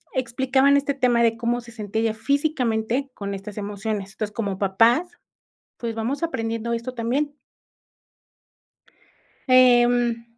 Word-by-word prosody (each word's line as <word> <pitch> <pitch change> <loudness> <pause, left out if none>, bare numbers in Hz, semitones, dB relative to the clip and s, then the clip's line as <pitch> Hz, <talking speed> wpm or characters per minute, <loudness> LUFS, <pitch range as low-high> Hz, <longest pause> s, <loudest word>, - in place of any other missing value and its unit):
explicaban 265 +2 +2
este 280 0 +1
tema 245 -3 +2
de 230 0 +2
cómo 240 +1 -1
se 235 0 -13
sentía 220 -1 -3
ella 225 -1 +1
físicamente 265 -2 -1
con 200 -3 -5
estas 195 +2 -9
emociones, 205 -1 -4
entonces, 210 -1 -4
como 200 -4 -3
papás, 225 - +3 0.7
pues, 230 -1 -4
vamos 245 +8 -3
aprendiendo 230 -6 -2
esto 235 +2 -4
también. 270 +5 -1 2.1
Em. 245 -2 +4
235 Hz, 120 wpm, -23 LUFS, 220-255 Hz, 2.1 s, Em